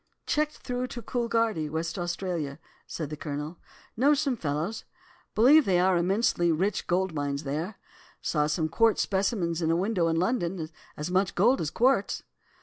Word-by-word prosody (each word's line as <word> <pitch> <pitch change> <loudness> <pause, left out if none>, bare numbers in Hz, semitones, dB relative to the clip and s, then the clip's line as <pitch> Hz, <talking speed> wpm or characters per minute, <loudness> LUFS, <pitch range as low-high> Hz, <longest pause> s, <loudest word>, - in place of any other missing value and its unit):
"'Checked 300 0 0
through 250 0 -3
to 240 - -7
Coolgardie, 230 -9 0
West 160 +3 -3
Australia,' 170 -4 -3 0.3
said 155 -3 -5
the - - -3
Colonel. 150 +2 -5 0.4
'Know 280 +6 +4
some 280 -3 0
fellows. 165 +4 -3 0.5
Believe 275 +7 +7
there 180 -2 +3
are 190 -1 +4
immensely 175 -1 +2
rich 190 +5 0
gold 185 0 +1
mines 145 -1 -2
there. 155 +9 -3 0.4
Saw 150 -2 0
some 155 +1 0
quartz 225 +7 +3
specimens 190 -4 0
in 160 - +1
a 165 - +3
window 185 -1 +1
in 165 - +1
London, 175 -3 0 0.3
as 150 +4 -4
much 190 +1 +1
gold 240 +9 +4
as 155 - -1
quartz. 240 +1 +1
180 Hz, 160 wpm, -28 LUFS, 160-225 Hz, 0.5 s, Believe